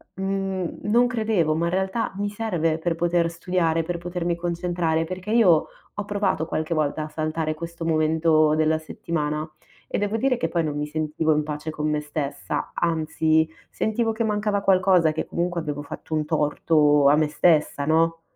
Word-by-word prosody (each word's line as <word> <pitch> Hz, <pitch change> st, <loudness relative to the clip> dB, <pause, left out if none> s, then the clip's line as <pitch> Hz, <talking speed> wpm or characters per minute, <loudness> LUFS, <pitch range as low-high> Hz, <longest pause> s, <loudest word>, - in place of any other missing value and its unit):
mhmm 195 Hz, -2 st, -3 dB
non 235 Hz, +4 st, +3 dB
credevo, 215 Hz, -10 st, +1 dB
ma 170 Hz, +1 st, 0 dB
in -, -, -1 dB
realtà 190 Hz, +4 st, -1 dB
mi 205 Hz, 0 st, -1 dB
serve 175 Hz, -7 st, -1 dB
per 165 Hz, 0 st, -1 dB
poter 170 Hz, 0 st, +1 dB
studiare, 165 Hz, -1 st, 0 dB
per 175 Hz, +1 st, -3 dB
potermi 175 Hz, 0 st, -2 dB
concentrare, 170 Hz, -1 st, -1 dB
perché 185 Hz, +4 st, -6 dB
io 185 Hz, -9 st, +4 dB, 0.3 s
ho 205 Hz, -, -4 dB
provato 200 Hz, -6 st, 0 dB
qualche 160 Hz, +1 st, -2 dB
volta 155 Hz, 0 st, 0 dB
a 155 Hz, -, -7 dB
saltare 155 Hz, 0 st, -2 dB
questo 170 Hz, +1 st, -7 dB
momento 155 Hz, -1 st, +3 dB
della 155 Hz, 0 st, +2 dB
settimana 155 Hz, -1 st, -3 dB, 0.4 s
e -, -, -1 dB
devo 205 Hz, +2 st, -1 dB
dire 255 Hz, +1 st, +1 dB
che 165 Hz, -, -1 dB
poi 170 Hz, -1 st, 0 dB
non 150 Hz, -2 st, -2 dB
mi 150 Hz, 0 st, -2 dB
sentivo 155 Hz, +1 st, 0 dB
in 150 Hz, -, +1 dB
pace 150 Hz, +1 st, -5 dB
con 155 Hz, -1 st, -2 dB
me 150 Hz, 0 st, 0 dB
stessa, 145 Hz, -2 st, -4 dB
anzi 160 Hz, -1 st, +1 dB, 0.2 s
sentivo 225 Hz, +1 st, 0 dB
che 230 Hz, +1 st, -1 dB
mancava 210 Hz, -1 st, 0 dB
qualcosa, 185 Hz, -4 st, +4 dB
che 160 Hz, -, -3 dB
comunque 175 Hz, 0 st, -2 dB
avevo 145 Hz, -2 st, -4 dB
fatto 145 Hz, -, -8 dB
un 155 Hz, -1 st, +1 dB
torto 150 Hz, -1 st, +3 dB
a 145 Hz, -, +6 dB
me 155 Hz, -1 st, +2 dB
stessa, 150 Hz, -2 st, +2 dB
no 165 Hz, +2 st, +2 dB
165 Hz, 175 wpm, -24 LUFS, 155-185 Hz, 0.4 s, a